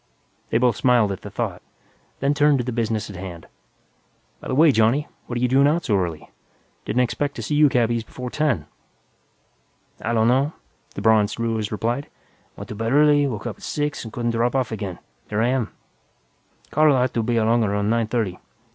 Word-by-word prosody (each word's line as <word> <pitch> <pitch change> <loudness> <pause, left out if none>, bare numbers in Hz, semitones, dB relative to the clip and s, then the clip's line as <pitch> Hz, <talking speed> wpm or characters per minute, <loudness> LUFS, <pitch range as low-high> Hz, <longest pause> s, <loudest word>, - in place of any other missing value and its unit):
They - - +2
both 120 -2 +2
smiled 120 -5 +3
at 95 - -5
the - - -8
thought, - - -4 0.6
then 140 +2 +2
turned 145 0 +4
to 125 - -1
the 125 - -3
business 115 -3 -1
at - - -10
hand. 90 -3 -8 0.9
"By - - -9
the - - -1
way, 155 +2 +6
Johnny, 120 +5 +2 0.2
what're 120 - -3
you 125 +1 +2
doing 135 +3 +4
out 165 +4 +1
so 105 - +2
early? 85 -5 -2 0.6
Didn't 120 +4 +1
expect 145 +3 -2
to - - -5
see - - -3
you 150 0 +5
cabbies 120 -2 +1
before 125 +2 -7
ten." 150 - 0 1.4
"I 115 - -1
donno," 125 +7 +2 0.4
the 100 - -5
bronzed 110 0 +3
Ruiz 110 -2 -1
replied. 120 +6 -2 0.5
"Went - - -9
to - - -6
bed 115 +2 -2
early, 145 0 +5
woke 110 -5 -5
up - - -4
at - - -21
six 150 -1 -3
and 115 - -8
couldn't 120 +1 -1
drop 115 +2 0
off 130 -4 0
again. 100 -5 -4
And - - -22 0.3
here 105 +1 0
I 120 - +2
am. 125 -4 0 1.0
Carl 155 -2 +4
ought 125 -1 +1
to 115 - 0
be 120 +1 0
along 115 +1 +3
around 105 0 0
nine 115 -1 +1
thirty. 110 -6 -2
120 Hz, 200 wpm, -22 LUFS, 110-135 Hz, 1.4 s, way